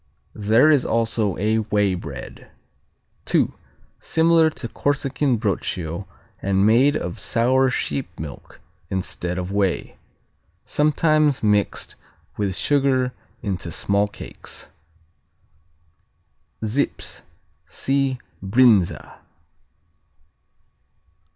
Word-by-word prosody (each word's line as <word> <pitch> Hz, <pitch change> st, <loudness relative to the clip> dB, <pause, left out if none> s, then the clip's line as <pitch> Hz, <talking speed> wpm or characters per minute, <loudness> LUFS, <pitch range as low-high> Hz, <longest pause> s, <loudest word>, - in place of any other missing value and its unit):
There 110 Hz, +8 st, +4 dB
is 140 Hz, -4 st, +4 dB
also 115 Hz, -3 st, 0 dB
a 110 Hz, +3 st, +1 dB
whey 105 Hz, -2 st, +1 dB
bread. 90 Hz, -, -8 dB, 0.8 s
II. -, -, +3 dB, 0.5 s
Similar 165 Hz, 0 st, +3 dB
to 130 Hz, -, -6 dB
Corsican 140 Hz, 0 st, 0 dB
Broccio 95 Hz, -3 st, -3 dB, 0.3 s
and 95 Hz, 0 st, +2 dB
made 125 Hz, +7 st, +4 dB
of 90 Hz, +5 st, -5 dB
sour 125 Hz, +5 st, +2 dB
sheep 125 Hz, -7 st, -3 dB
milk 75 Hz, -2 st, -9 dB, 0.3 s
instead 90 Hz, -1 st, -3 dB
of 90 Hz, +1 st, -3 dB
whey. 100 Hz, -3 st, -1 dB, 0.7 s
Sometimes 155 Hz, -1 st, +2 dB
mixed 105 Hz, -1 st, +1 dB, 0.4 s
with 100 Hz, -3 st, -1 dB
sugar 135 Hz, -2 st, +2 dB, 0.3 s
into 95 Hz, -4 st, -3 dB
small 100 Hz, +4 st, +1 dB
cakes. 100 Hz, -, -8 dB, 1.9 s
Zips 120 Hz, +7 st, -2 dB, 0.5 s
see 135 Hz, -1 st, 0 dB, 0.3 s
Brinza. 100 Hz, -5 st, +3 dB
110 Hz, 85 wpm, -22 LUFS, 100-135 Hz, 1.9 s, There